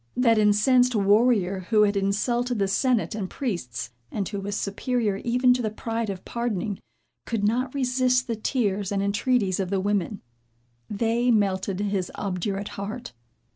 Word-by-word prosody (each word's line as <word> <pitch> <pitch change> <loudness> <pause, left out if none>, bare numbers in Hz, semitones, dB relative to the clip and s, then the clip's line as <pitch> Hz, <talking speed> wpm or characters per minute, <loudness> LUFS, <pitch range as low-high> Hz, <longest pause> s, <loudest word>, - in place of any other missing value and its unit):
That 230 -3 +4
incensed 240 +4 +4
warrior 200 -3 +2
who 215 -2 +5
had 205 -1 +2
insulted 235 +5 0
the 200 -1 +1
senate 235 +4 +1
and 200 -4 -4
priests, 170 - -4 0.2
and 200 -3 -2
who 200 - -4
was 205 +1 -3
superior 210 +1 -1
even 250 +3 +3
to 250 - -1
the 220 - -1
pride 225 +1 -3
of 190 -2 -6
pardoning, 220 -4 -2 0.5
could 225 -3 -2
not 245 +5 0
resist 255 -1 +2
the 235 -3 -2
tears 210 -4 -1
and 200 -1 0
entreaties 200 -1 +1
of 190 -2 -1
the 195 0 0
women. 200 0 -1 0.7
They 230 +3 +1
melted 195 -3 +1
his 200 -3 -1
obdurate 195 +1 -3
heart. 200 - -6
210 Hz, 155 wpm, -25 LUFS, 195-240 Hz, 0.7 s, who